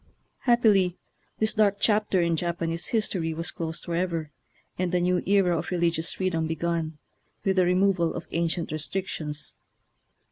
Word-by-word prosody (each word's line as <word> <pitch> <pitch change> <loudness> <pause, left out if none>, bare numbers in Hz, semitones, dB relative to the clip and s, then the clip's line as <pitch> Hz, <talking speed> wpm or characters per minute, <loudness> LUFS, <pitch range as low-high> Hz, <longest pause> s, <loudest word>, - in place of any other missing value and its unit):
Happily 210 -7 +4 0.4
this 220 0 +1
dark 205 -2 +3
chapter 210 -4 +3
in 170 -1 +1
Japanese 170 0 -1
history 185 -8 0
was 165 +1 -2
closed 165 0 -4
forever, 170 -3 -2 0.4
and 180 -1 -1
a - - +3
new 180 0 +2
era 195 -3 +4
of 160 0 -3
religious 170 -2 +1
freedom 165 -4 -1
begun, 165 -1 -2 0.5
with 190 -1 +1
the 185 - +5
removal 180 -2 +2
of 170 - -5
ancient 170 -1 -1
restrictions. 155 -1 -2
175 Hz, 140 wpm, -26 LUFS, 165-190 Hz, 0.5 s, the